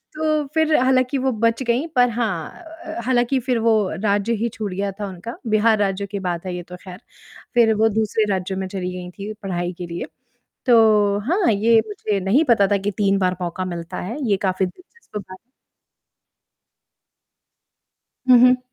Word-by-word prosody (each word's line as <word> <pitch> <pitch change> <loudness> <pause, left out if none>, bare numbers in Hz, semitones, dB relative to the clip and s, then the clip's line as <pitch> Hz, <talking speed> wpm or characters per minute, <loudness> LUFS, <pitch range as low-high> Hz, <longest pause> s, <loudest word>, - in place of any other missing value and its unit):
तो 310 -1 0
फ़िर 315 -1 +2
हालाँकि 255 +1 +2
वो 265 0 +1
बच 230 +2 0
गई 240 +5 0
पर 245 -1 +5
हाँ 220 - -3 0.4
हालाँकि 255 +1 +2
फ़िर 250 -1 -1
वो 225 0 +3 0.3
राज्य 205 +2 +1
ही 230 +2 -1
छूट 210 -3 -4
गया 200 +1 -2
था 205 - -2
उनका, 190 +6 -8
बिहार 215 0 +3
राज्य 200 0 0
की 200 0 -5
बात 180 -1 -3
है 180 -1 -4
ये 175 - -6
तो 180 - -10
खैर 185 0 -10 0.5
फ़िर 230 -2 +4
वो 220 +1 +3
दूसरे 220 0 0
राज्यों 190 0 -2
में 190 - -3
चली 185 -1 -4
गई 180 -1 -7
थी 200 +3 -7
पढ़ाई 175 -2 -2
के 175 - -5
लिए। 170 0 -5 0.6
तो 215 -4 +5
हाँ, 360 - +3
ये 225 +2 +4
मुझे 210 0 -2
नहीं 215 - +3
पता 200 -4 +5
था 200 - +3
कि 200 +1 -2
3 200 -1 +2
बार 185 -1 0
मौका 175 +2 -3
मिलता 170 -2 -6
है। 225 +9 -5
ये 200 - +4
काफ़ी 185 0 +1
दिलचस्प 365 - -11
बात 185 -1 -10 2.9
हुँ, 250 -1 +8
हुँ। 250 0 +4
210 Hz, 175 wpm, -21 LUFS, 190-235 Hz, 2.9 s, हुँ